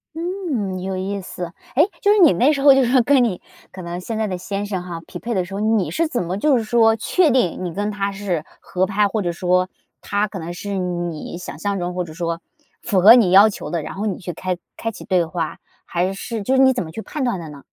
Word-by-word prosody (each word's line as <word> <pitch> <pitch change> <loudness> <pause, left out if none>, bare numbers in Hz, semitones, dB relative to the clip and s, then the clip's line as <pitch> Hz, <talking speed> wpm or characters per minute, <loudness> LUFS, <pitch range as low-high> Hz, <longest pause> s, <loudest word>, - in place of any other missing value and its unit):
嗯， 320 - -3
有 190 0 -3
意 195 +2 -3
思， 175 -2 -7 0.2
诶， 310 +7 +5
就 405 - +4
是 420 - +4
你 350 - +7
那 250 - +4
时 280 -2 -1
候 280 -1 +9
就 270 0 +4
是 240 - 0
说 260 - +5
跟 270 0 +4
你 205 -7 -1 0.3
可 185 - -9
能 170 +1 -5
现 220 +4 -4
在 220 - 0
的 185 -3 -3
先 200 +2 -3
生 195 -3 -3
哈 175 -2 -6
匹 175 - -8
配 235 +3 -3
的 185 -2 0
时 190 - -10
候， 195 - -3
你 215 -2 +1
是 330 0 +1
怎 250 -10 -2
么 175 +2 -3
就 275 +5 +3
是 230 - -1
说 225 0 +4
确 320 - +2
定 235 - +1
你 180 - -3
跟 205 +4 -2
他 200 -1 -2
是 195 -5 -3 0.2
合 185 +1 -1
拍， 205 +1 +2
或 210 +2 -2
者 175 -3 -1
说 180 +1 +1 0.3
他 205 +1 0
可 200 -2 -7
能 165 +1 -6
是 200 +3 -5
你 175 -3 -3
想 175 -4 -8
象 200 +3 -1
中 180 -1 -3
或 180 0 -2
者 165 - -10
说 170 -1 -3 0.4
符 190 -3 +1
合 210 +5 +10
你 235 -7 +5
要 200 +3 +8
求 205 - -7
的， 170 -3 -2
然 - - -6
后 205 +3 -3
你 195 - -2
去 175 -1 -6
开 185 +2 -3 0.2
开 225 - -2
启 - - -11
对 180 -2 +2
话， 165 -2 -4 0.3
还 180 +2 -1
是 215 +3 -5
就 260 +7 +1
是 265 - +5
你 265 0 +6
怎 245 - -2
么 160 - -9
去 195 +8 -7
判 300 - -4
断 240 -7 0
的 165 -2 -8
呢？ 145 -1 -11
195 Hz, 285 characters per minute, -21 LUFS, 180-230 Hz, 0.4 s, 合